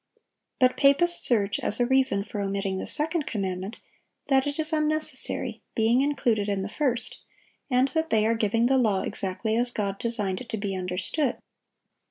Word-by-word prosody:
But 255 Hz, -1 st, +3 dB
papists 295 Hz, +5 st, +4 dB
urge, 205 Hz, -4 st, +1 dB
as 210 Hz, -, 0 dB
a 245 Hz, -, +3 dB
reason 260 Hz, -5 st, +2 dB
for 210 Hz, -1 st, -5 dB
omitting 195 Hz, -1 st, -2 dB
the -, -, -5 dB
second 315 Hz, 0 st, 0 dB
commandment, 190 Hz, 0 st, -3 dB, 0.5 s
that 270 Hz, 0 st, +3 dB
it 290 Hz, -, -3 dB
is 315 Hz, 0 st, -2 dB
unnecessary, 305 Hz, -6 st, 0 dB
being 230 Hz, +3 st, +3 dB
included 235 Hz, -7 st, 0 dB
in 195 Hz, -1 st, -1 dB
the 200 Hz, -, -5 dB
first, 250 Hz, -2 st, -2 dB, 0.5 s
and 255 Hz, +1 st, +3 dB
that 320 Hz, +3 st, -1 dB
they 215 Hz, -1 st, +3 dB
are 225 Hz, -, +3 dB
giving 225 Hz, +1 st, +1 dB
the 265 Hz, +1 st, +3 dB
law 210 Hz, -6 st, +1 dB
exactly 200 Hz, +4 st, -3 dB
as 240 Hz, +1 st, 0 dB
God 200 Hz, -4 st, -3 dB
designed 205 Hz, -5 st, -2 dB
it 245 Hz, -, -10 dB
to 220 Hz, -, -3 dB
be 200 Hz, -2 st, -3 dB
understood. 185 Hz, -, -1 dB
230 Hz, 175 wpm, -26 LUFS, 200-270 Hz, 0.5 s, papists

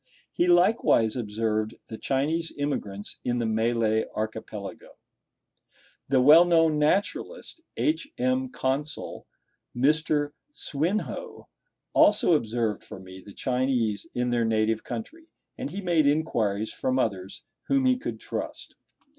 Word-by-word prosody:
He 175 Hz, -, +1 dB
likewise 175 Hz, -, +4 dB
observed 110 Hz, -1 st, -1 dB
the 110 Hz, -, -8 dB
Chinese 155 Hz, +5 st, 0 dB
immigrants 105 Hz, -9 st, -3 dB
in 120 Hz, 0 st, 0 dB
the 120 Hz, -, 0 dB
Malay 110 Hz, 0 st, +1 dB
archipelago. 110 Hz, -2 st, -6 dB, 1.1 s
The 135 Hz, -1 st, +3 dB
well 155 Hz, +5 st, +9 dB
known 165 Hz, -3 st, +3 dB
naturalist, 200 Hz, -, -1 dB, 0.2 s
H. 310 Hz, -2 st, 0 dB
M. 255 Hz, 0 st, 0 dB
Consul, 145 Hz, -, -3 dB, 0.5 s
Mr. 145 Hz, +2 st, +2 dB, 0.2 s
Swinhoe, 215 Hz, -, -3 dB, 0.5 s
also 210 Hz, -4 st, +5 dB
observed 115 Hz, -6 st, 0 dB
for -, -, -9 dB
me 95 Hz, 0 st, -11 dB
the 100 Hz, -, -13 dB
Chinese 125 Hz, 0 st, -1 dB
in 125 Hz, 0 st, 0 dB
their 120 Hz, -1 st, +2 dB
native 110 Hz, 0 st, +1 dB
country; 320 Hz, +9 st, -7 dB, 0.3 s
and -, -, -5 dB
he 195 Hz, +6 st, -5 dB
made 170 Hz, -5 st, +2 dB
inquiries 110 Hz, -9 st, 0 dB
from 130 Hz, 0 st, -1 dB
others 95 Hz, -6 st, -2 dB, 0.2 s
whom 275 Hz, -1 st, +2 dB
he 255 Hz, 0 st, +4 dB
could 255 Hz, -, -5 dB
trust. -, -, -6 dB
130 Hz, 120 wpm, -26 LUFS, 110-170 Hz, 1.1 s, well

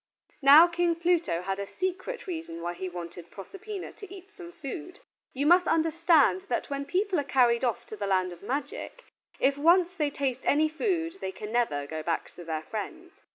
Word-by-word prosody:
Now 290 Hz, +4 st, +9 dB
King 345 Hz, 0 st, +1 dB
Pluto 335 Hz, -, +1 dB
had 195 Hz, +1 st, -3 dB
a 200 Hz, -, -4 dB
secret 375 Hz, -, -4 dB
reason 325 Hz, -, -6 dB
why 175 Hz, 0 st, -2 dB
he 185 Hz, +1 st, -5 dB
wanted 175 Hz, -1 st, -8 dB
Proserpina 390 Hz, -, -8 dB
to 405 Hz, -4 st, -11 dB
eat 390 Hz, 0 st, -12 dB
some 360 Hz, -4 st, -11 dB
food. 330 Hz, +2 st, -8 dB, 0.3 s
You 275 Hz, +2 st, -2 dB
must 350 Hz, +2 st, +5 dB
understand 320 Hz, -, +3 dB
that 245 Hz, -, -2 dB
when 280 Hz, 0 st, -2 dB
people 370 Hz, +2 st, 0 dB
are -, -, 0 dB
carried 250 Hz, -3 st, +3 dB
off 240 Hz, -3 st, -1 dB
to -, -, -8 dB
the 205 Hz, -1 st, -4 dB
land 185 Hz, -2 st, +1 dB
of 175 Hz, -, -11 dB
magic, 290 Hz, -, -5 dB, 0.4 s
if 280 Hz, +1 st, +2 dB
once 345 Hz, +3 st, +4 dB
they 305 Hz, -6 st, 0 dB
taste 265 Hz, -3 st, -2 dB
any 310 Hz, +2 st, +3 dB
food 335 Hz, 0 st, -1 dB
they 190 Hz, -, -3 dB
can 210 Hz, +3 st, -8 dB
never 225 Hz, -13 st, 0 dB
go 155 Hz, +2 st, -5 dB
back 165 Hz, +1 st, -2 dB
to 175 Hz, -, -11 dB
their 160 Hz, -2 st, -4 dB
friends. 325 Hz, -, -6 dB
285 Hz, 195 wpm, -28 LUFS, -, 0.4 s, Now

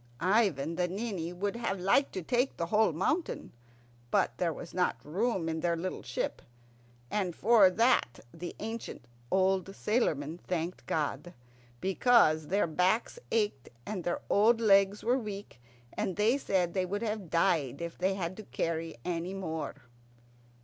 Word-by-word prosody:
Ivan 180 Hz, -, +2 dB
the 180 Hz, -1 st, +1 dB
Ninny 190 Hz, -3 st, -3 dB
would 195 Hz, +4 st, -2 dB
have 200 Hz, -5 st, -2 dB
liked 200 Hz, +10 st, +3 dB
to 185 Hz, -, -4 dB
take 245 Hz, +9 st, 0 dB
the 170 Hz, -, -1 dB
whole 210 Hz, +3 st, +3 dB
mountain, 310 Hz, -, -1 dB, 0.6 s
but 120 Hz, -, +2 dB
there 175 Hz, -2 st, +1 dB
was 165 Hz, +2 st, -8 dB
not 180 Hz, -9 st, +1 dB
room 190 Hz, +2 st, 0 dB
in 160 Hz, 0 st, -2 dB
the 170 Hz, +1 st, +1 dB
little 180 Hz, +3 st, -4 dB
ship. 125 Hz, +1 st, -3 dB, 0.7 s
And 185 Hz, -5 st, -1 dB
for 215 Hz, -3 st, +6 dB
that 225 Hz, -, +2 dB
the 175 Hz, +1 st, -7 dB
ancient 225 Hz, +2 st, -6 dB, 0.2 s
old 190 Hz, 0 st, +2 dB
sailormen 165 Hz, -, 0 dB
thanked 175 Hz, 0 st, -4 dB
God, 150 Hz, +2 st, -2 dB, 0.4 s
because 185 Hz, -, +4 dB
their 200 Hz, +5 st, +2 dB
backs 180 Hz, -, +1 dB
ached 210 Hz, -, 0 dB, 0.2 s
and 195 Hz, -4 st, -4 dB
their 175 Hz, -, -1 dB
old 225 Hz, +3 st, +4 dB
legs 200 Hz, -2 st, +4 dB
were 245 Hz, +3 st, +2 dB
weak, 200 Hz, -, -7 dB, 0.3 s
and 185 Hz, -, -2 dB
they 215 Hz, +5 st, +3 dB
said 185 Hz, -10 st, 0 dB
they 185 Hz, -1 st, 0 dB
would 205 Hz, +4 st, -3 dB
have 210 Hz, -5 st, -3 dB
died 160 Hz, -6 st, +1 dB
if 170 Hz, 0 st, -5 dB
they 190 Hz, +2 st, 0 dB
had 190 Hz, -, -3 dB
had 170 Hz, +2 st, -4 dB
to 215 Hz, -, -7 dB
carry 165 Hz, -2 st, -3 dB
any 175 Hz, +2 st, -2 dB
more. 160 Hz, -6 st, -5 dB
185 Hz, 155 wpm, -31 LUFS, 165-210 Hz, 0.7 s, for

